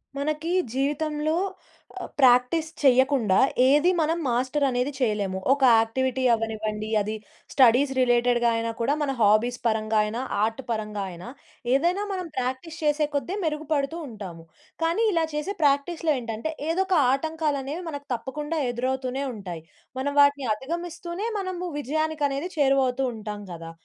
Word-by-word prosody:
మనకీ 305 Hz, +4 st, -2 dB, 0.2 s
జీవితంలో 300 Hz, +3 st, -1 dB, 0.8 s
ప్రాక్టీస్ 260 Hz, +5 st, +4 dB
చెయ్యకుండా 260 Hz, -6 st, +4 dB, 0.3 s
ఏది 295 Hz, +7 st, +5 dB
మనం 325 Hz, +1 st, +1 dB
మాస్టర్ 260 Hz, +4 st, +1 dB
అనేది 250 Hz, +2 st, -1 dB
చేయలేము. 210 Hz, -6 st, 0 dB, 0.2 s
ఒక 280 Hz, -, -4 dB, 0.2 s
యాక్టివిటీ 260 Hz, +3 st, 0 dB
అవ్వనివ్వండి, 215 Hz, -1 st, -3 dB
అది 215 Hz, +2 st, -3 dB, 0.4 s
స్టడీస్ 265 Hz, +1 st, +5 dB
రిలేటెడ్‌గా 240 Hz, -1 st, +3 dB
అయినా 230 Hz, 0 st, -1 dB
కూడా 255 Hz, +5 st, +2 dB
మన 285 Hz, -2 st, 0 dB
హాబీస్ 215 Hz, +4 st, +3 dB
పరంగా 220 Hz, 0 st, 0 dB
అయినా 215 Hz, +3 st, -3 dB, 0.2 s
ఆర్ట్ 225 Hz, +4 st, -1 dB
పరంగా 215 Hz, -3 st, -2 dB
అయినా 175 Hz, +4 st, -10 dB, 0.5 s
ఏదైనా 345 Hz, +8 st, +2 dB
మనం 365 Hz, -2 st, -4 dB
ప్రాక్టీస్ 260 Hz, +6 st, -3 dB
చేసే 300 Hz, 0 st, +2 dB
కొద్ది 340 Hz, +7 st, -1 dB
మెరుగుపడుతూ 305 Hz, 0 st, -1 dB
ఉంటాము. 190 Hz, -7 st, -9 dB, 0.4 s
కానీ 340 Hz, +8 st, +2 dB
ఇలా 330 Hz, -1 st, +2 dB
చేసే 300 Hz, +7 st, -3 dB
ప్రాక్టీస్‌లో 300 Hz, +3 st, +2 dB
ఏంటంటే 230 Hz, +5 st, -4 dB, 0.2 s
ఏదో 360 Hz, +4 st, +2 dB
ఒక 370 Hz, -3 st, +3 dB, 0.2 s
ఆటంకాలనేవి 305 Hz, +1 st, -2 dB
మనకు 285 Hz, -2 st, -7 dB
తప్పకుండా 295 Hz, +6 st, -4 dB
ఎదురవుతూనే 260 Hz, +2 st, -2 dB
ఉంటాయి. 180 Hz, -6 st, -7 dB, 0.4 s
మనం 285 Hz, +2 st, -1 dB
వాటిని 285 Hz, -3 st, +3 dB
అధగమిస్తూనే 345 Hz, -, -5 dB
మనము 370 Hz, -2 st, -4 dB
విజయానికనేది 300 Hz, +1 st, -1 dB
చేరువౌతూ 270 Hz, -2 st, +2 dB
ఉంటాం 210 Hz, -1 st, -6 dB
కదా! 165 Hz, -1 st, -8 dB
270 Hz, 130 wpm, -25 LUFS, 230-310 Hz, 0.8 s, ఏది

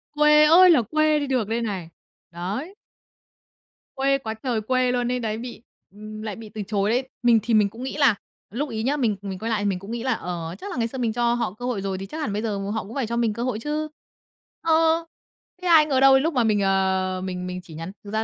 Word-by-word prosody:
Quê 300 Hz, 0 st, +6 dB
ơi 355 Hz, +4 st, +7 dB
là 320 Hz, -7 st, +6 dB
quê 310 Hz, +6 st, +2 dB
đi 285 Hz, -, -3 dB
được 255 Hz, -6 st, 0 dB
đây 230 Hz, +2 st, -1 dB
này. 195 Hz, -7 st, -4 dB, 0.4 s
Đấy. 200 Hz, -, -5 dB, 1.2 s
Quê 275 Hz, +1 st, +2 dB
quá 225 Hz, -5 st, -5 dB
trời 225 Hz, 0 st, -2 dB
quê 255 Hz, +3 st, +1 dB
luôn 245 Hz, 0 st, 0 dB
ấy 250 Hz, -, -1 dB
đấy 220 Hz, -2 st, -2 dB
bị 240 Hz, 0 st, -8 dB, 0.3 s
ừm, 215 Hz, +2 st, -9 dB
lại 215 Hz, -2 st, -5 dB
bị 225 Hz, -1 st, -10 dB
từ 210 Hz, +1 st, -6 dB
chối 205 Hz, -1 st, 0 dB
đấy! 250 Hz, +3 st, 0 dB, 0.2 s
Mình 235 Hz, -2 st, +5 dB
thì 235 Hz, -, -1 dB
mình 210 Hz, -2 st, +4 dB
cũng 230 Hz, +5 st, -9 dB
nghĩ 265 Hz, -, -5 dB
là 275 Hz, -7 st, +4 dB, 0.3 s
lúc 275 Hz, +7 st, -3 dB
ấy 220 Hz, -2 st, -3 dB
nhá, 280 Hz, +5 st, 0 dB
mình 230 Hz, -7 st, +1 dB
mình 195 Hz, -2 st, -6 dB
quay 225 Hz, -, -3 dB
lại 220 Hz, -3 st, 0 dB
thì -, -, -1 dB
mình 185 Hz, -2 st, -2 dB
cũng 195 Hz, +4 st, -9 dB
nghĩ 235 Hz, 0 st, -4 dB
là, 255 Hz, -2 st, +1 dB
ờ, 170 Hz, -4 st, -5 dB
chắc 400 Hz, -, -7 dB
là -, -, -5 dB
ngày 230 Hz, -1 st, +1 dB
xưa 265 Hz, -, -8 dB
mình 235 Hz, -3 st, -1 dB
cho 235 Hz, 0 st, +1 dB
họ 235 Hz, -5 st, -2 dB
cơ 245 Hz, +4 st, -8 dB
hội 245 Hz, -5 st, -2 dB
rồi 195 Hz, -1 st, -3 dB
thì 195 Hz, -, -6 dB
chắc 200 Hz, -, -8 dB
hẳn 215 Hz, -9 st, -2 dB
bây 210 Hz, -, -1 dB
giờ 215 Hz, -3 st, -2 dB
họ 200 Hz, +3 st, -3 dB
cũng 220 Hz, -, -10 dB
phải 265 Hz, -5 st, -1 dB
cho 235 Hz, +1 st, -2 dB
mình 230 Hz, -2 st, +1 dB
cơ 235 Hz, +3 st, -4 dB
hội 245 Hz, -4 st, -2 dB
chứ. 300 Hz, +5 st, -2 dB, 0.7 s
Ờ. 325 Hz, 0 st, +3 dB, 0.6 s
Thế 365 Hz, -, -3 dB
ai 320 Hz, -3 st, +7 dB
ngờ 275 Hz, -4 st, +1 dB
đâu, 270 Hz, 0 st, +7 dB
lúc 320 Hz, +4 st, 0 dB
mà 250 Hz, -3 st, +2 dB
mình, 210 Hz, -2 st, +2 dB
ờ, 190 Hz, -1 st, +1 dB
mình 180 Hz, -1 st, -4 dB
mình 180 Hz, 0 st, -5 dB
chỉ 165 Hz, -, -13 dB
nhắn 165 Hz, +4 st, -6 dB
thực 200 Hz, -, -9 dB
ra 220 Hz, +1 st, 0 dB
230 Hz, 265 wpm, -24 LUFS, 205-265 Hz, 1.2 s, ơi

